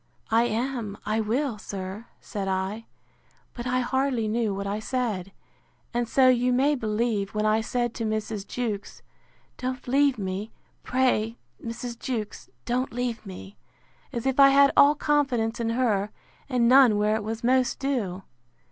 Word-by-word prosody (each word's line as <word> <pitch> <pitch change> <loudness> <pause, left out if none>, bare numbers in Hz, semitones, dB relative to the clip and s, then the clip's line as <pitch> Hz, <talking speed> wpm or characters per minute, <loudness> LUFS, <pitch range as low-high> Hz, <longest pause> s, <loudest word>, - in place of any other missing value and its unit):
I 230 +2 +4
am, 235 -3 -2
I 215 +1 0
will, 235 +1 -1
sir, 195 +3 -6
said 200 -3 -5
I; 190 +4 -2 0.7
but 240 0 -6
I 255 0 +1
hardly 255 -2 0
knew 220 0 0
what 200 0 -4
I 200 +2 -2
said; 215 -6 -2 0.6
and 240 -1 -1
so 260 +1 +5
you 250 0 +4
may 270 +4 +3
believe, 215 -4 -1
when 210 0 0
I 215 +1 +3
said 240 +1 -1
to 230 - -4
Mrs. 215 -2 -3
Jewkes, 220 -5 -4 0.6
Don't 255 0 -4
leave 275 +1 +3
me; 195 +2 -4 0.3
pray, 245 -3 +1 0.3
Mrs. 235 +1 -6
Jewkes, 220 -5 -4 0.2
don't 250 +2 -1
leave 240 -1 -3
me; 195 +1 -10 0.5
as 235 -3 -4
if 265 0 0
I 275 0 +9
had 275 0 +6
all 290 +1 +7
confidence 270 -7 +1
in 230 -1 -1
her, 225 -4 +1 0.4
and 245 -3 +2
none 250 -4 +6
where 210 +1 +2
it 220 - -2
was 225 +2 -4
most 255 0 +2
due. 215 -10 -2
235 Hz, 155 wpm, -26 LUFS, 210-255 Hz, 0.7 s, I